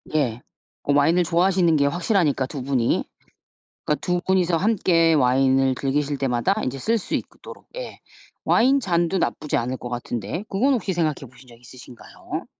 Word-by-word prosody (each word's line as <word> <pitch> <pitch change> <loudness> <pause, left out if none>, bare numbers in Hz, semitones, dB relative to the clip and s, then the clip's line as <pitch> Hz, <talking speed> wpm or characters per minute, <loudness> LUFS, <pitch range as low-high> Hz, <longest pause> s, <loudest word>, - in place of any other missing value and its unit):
예. 125 -5 0 0.4
고 145 - +1
와인을 160 +5 +3
좋아하시는 175 0 +2
게 140 - +2
확실하니까 165 - +1
2 135 0 -7
분이. 130 -3 0 0.8
그러니까 150 - -1
2 180 0 -1
분이서 180 -2 +2
함께 175 -4 +2
와인을 135 -1 +3
즐기실 145 +2 -1
때마다 135 +7 0
인제 130 +1 -3
쓸 225 - 0
수 195 - -6
있도록 - - -7
예. - - -7 0.4
와인 270 +4 +3
잔도 175 -3 0
나쁘지 150 -3 -1
않을 125 +2 -2
것 120 - -7
같은데 120 - -4
그건 255 +8 +2
혹시 200 -5 -2
생각해 155 -7 -2
보신 125 +1 -18
적 120 -1 -16
있으신가요? 125 0 -9
150 Hz, 345 characters per minute, -23 LUFS, 130-180 Hz, 0.8 s, 와인을